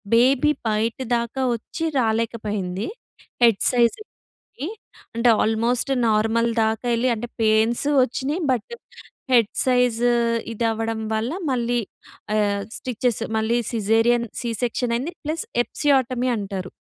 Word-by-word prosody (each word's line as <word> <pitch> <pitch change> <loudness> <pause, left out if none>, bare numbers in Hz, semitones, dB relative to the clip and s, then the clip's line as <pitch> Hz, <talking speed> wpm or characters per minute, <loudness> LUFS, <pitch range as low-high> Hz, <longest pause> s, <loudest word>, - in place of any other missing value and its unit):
Baby 265 +5 +4 0.2
బయట 220 +2 0 0.2
దాకా 235 +3 -3
వచ్చి 230 +8 -7 0.2
రాలేకపోయింది. 215 -4 -1 0.6
హెడ్ 230 -4 +5
సైజ్‌కి 245 - +1 1.1
అంటే 230 +1 +2
ఆల్మోస్ట్ 230 +4 +1 0.2
నార్మల్ 225 +2 +2 0.2
దాకా 220 +2 -2
ఎళ్లి 235 +2 +1
అంటే 230 +2 -5
పెయిన్స్ 220 +3 +2 0.2
వచ్చినాయి. 270 +7 -3
బట్ 245 - -3 0.6
హెడ్ 230 -4 +4
సైజ్ 250 -3 +2 0.5
ఇధవ్వడం 225 0 -1
వల్ల 220 +5 -1 0.2
మళ్ళీ 240 -1 0 0.6
ఆహ్, 205 -1 +1 0.2
స్టిచెస్ 245 -2 -1 0.2
మళ్ళీ 220 +2 +1
సిజేరియన్ 230 +2 +2
సి 240 - -3
సెక్షన్ 240 0 0
అయింది. 275 +9 -3
ప్లస్ 315 +7 -2 0.2
ఎపిసియోటమీ 255 -2 +1
అంటారు. 195 -3 -5
230 Hz, 110 wpm, -22 LUFS, 220-250 Hz, 1.1 s, హెడ్